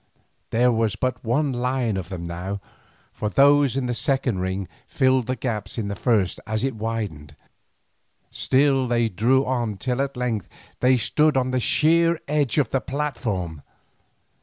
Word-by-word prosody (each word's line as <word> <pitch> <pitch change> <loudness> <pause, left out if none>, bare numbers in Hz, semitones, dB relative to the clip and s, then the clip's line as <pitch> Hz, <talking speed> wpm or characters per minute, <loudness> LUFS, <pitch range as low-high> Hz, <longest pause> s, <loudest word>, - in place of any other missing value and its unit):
There 125 +2 +3
was 110 -3 0
but 130 -1 -2
one 135 +4 +1
line 125 -2 -1
of 95 -2 -4
them 90 -3 -6
now, 90 +4 -4 0.5
for 105 - -3
those 140 +2 +4
in 135 - -1
the 125 - -1
second 130 -4 0
ring 95 +1 -2 0.2
filled 130 -3 +2
the 130 - -1
gaps 110 -4 -4
in 105 -3 -2
the 100 - -3
first 105 -6 +1
as 110 +2 -1
it 135 -1 0
widened; 105 -9 -5 1.0
still 135 -1 +2
they 120 -1 +1
drew 120 +8 +2
on 120 -5 -1
till 125 +6 -1
at 140 -2 -3
length 115 -6 -2 0.3
they 125 0 +4
stood 150 +4 +2
on 130 0 +1
the 130 - +1
sheer 165 +5 +3
edge 145 -3 +1
of 140 -6 +2
the 135 - +1
platform. 115 - -3
125 Hz, 160 wpm, -23 LUFS, 105-135 Hz, 1.0 s, those